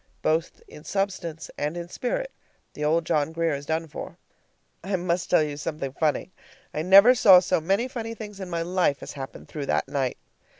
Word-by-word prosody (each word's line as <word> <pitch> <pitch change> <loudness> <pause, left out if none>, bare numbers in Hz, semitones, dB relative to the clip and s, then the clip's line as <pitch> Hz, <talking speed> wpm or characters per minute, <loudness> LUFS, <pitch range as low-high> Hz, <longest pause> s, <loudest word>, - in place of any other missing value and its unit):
Both 160 +1 0
in 150 - -13
substance 185 -5 -3
and 150 +4 -2
in 170 0 -5
spirit - - -3 0.4
the 150 - -5
old 160 +2 +2
John 150 0 +1
Grier 165 -1 0
is 140 0 -5
done 160 +1 -1
for. - - -8 0.7
I 190 +2 -1
must 175 -1 -1
tell - - +5
you 145 -1 -4
something 145 -3 -4
funny. 155 +5 0 0.4
I 155 - -2
never 195 +8 +8
saw 205 -7 +8
so 180 -2 0
many 195 +9 +1
funny 230 -3 -5
things 210 -3 -9
in 190 -2 -6
my 170 -1 -1
life 175 -5 0
as - - -7
happened 135 -1 -8
through 145 -3 -6
that - - 0
night. 135 -2 -1
170 Hz, 195 wpm, -25 LUFS, 150-195 Hz, 0.7 s, never